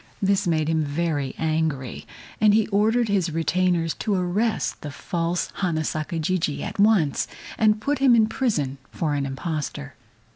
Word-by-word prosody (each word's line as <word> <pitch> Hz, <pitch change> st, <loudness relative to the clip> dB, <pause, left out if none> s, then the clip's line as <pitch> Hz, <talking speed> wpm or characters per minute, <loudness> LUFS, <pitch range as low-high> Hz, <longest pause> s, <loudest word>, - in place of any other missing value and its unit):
This 195 Hz, -1 st, +1 dB
made 155 Hz, -2 st, +1 dB
him 160 Hz, -1 st, +1 dB
very 145 Hz, -2 st, -2 dB
angry, 155 Hz, -5 st, -2 dB, 0.3 s
and 210 Hz, -1 st, +6 dB
he 220 Hz, -1 st, +3 dB
ordered 220 Hz, +3 st, +2 dB
his 195 Hz, -4 st, +1 dB
retainers 165 Hz, +1 st, +1 dB
to 210 Hz, -, 0 dB
arrest 190 Hz, +5 st, -1 dB
the 150 Hz, -, -5 dB
false 170 Hz, +4 st, -2 dB
Hana 165 Hz, -5 st, 0 dB
Saka 155 Hz, +2 st, -3 dB
Jijii 160 Hz, -2 st, -1 dB
at -, -, -6 dB
once 200 Hz, -9 st, +3 dB, 0.3 s
and 215 Hz, -1 st, +3 dB
put 285 Hz, +6 st, -1 dB
him 265 Hz, -3 st, +5 dB
in 225 Hz, -2 st, +5 dB
prison 155 Hz, -, -1 dB
for 155 Hz, -3 st, -1 dB
an 140 Hz, -1 st, -1 dB
impostor. 135 Hz, -, -4 dB
170 Hz, 155 wpm, -24 LUFS, 155-205 Hz, 0.3 s, and